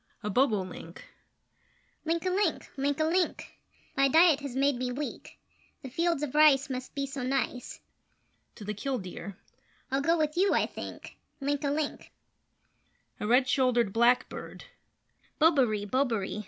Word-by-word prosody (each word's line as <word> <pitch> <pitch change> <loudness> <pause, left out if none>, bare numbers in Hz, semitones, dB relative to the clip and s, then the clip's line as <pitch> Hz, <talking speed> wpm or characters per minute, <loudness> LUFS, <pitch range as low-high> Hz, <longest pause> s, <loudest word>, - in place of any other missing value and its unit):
[A 210 - -2
Bobolink]: 190 -8 -1 1.0
Link 330 +2 -1
a 370 - +1
link! 380 -3 0
Link 280 +1 -1
a - - +3
link! 345 +3 0 0.4
My 275 - +4
diet 320 +1 +5
has 280 -3 -6
made 275 +1 +2
me 250 0 -2
weak; 285 +4 -6 0.5
The 265 - -8
fields 330 +1 0
of 285 - -3
rice 290 -3 +5
must 255 +2 -6
be 280 -1 -1
so 275 -1 -6
nice. 255 -1 -2 0.8
[To 215 - -10
the 210 - -3
Kildeer]: 200 -5 -5 0.5
I'll 270 +1 +1
go 330 +4 +2
with 305 -1 0
you, 385 +3 +3
I - - +3
think - - -9 0.2
Link 285 +1 -1
a 285 - +1
link! 290 +1 -3 1.1
[A 210 - -3
Red 250 +3 +4
Shouldered 250 -5 +2
Blackbird]: 240 +2 +1 0.8
Bobaree! 260 -10 +3
Bobaree! 225 -4 -1
275 Hz, 145 wpm, -29 LUFS, 245-300 Hz, 1.1 s, diet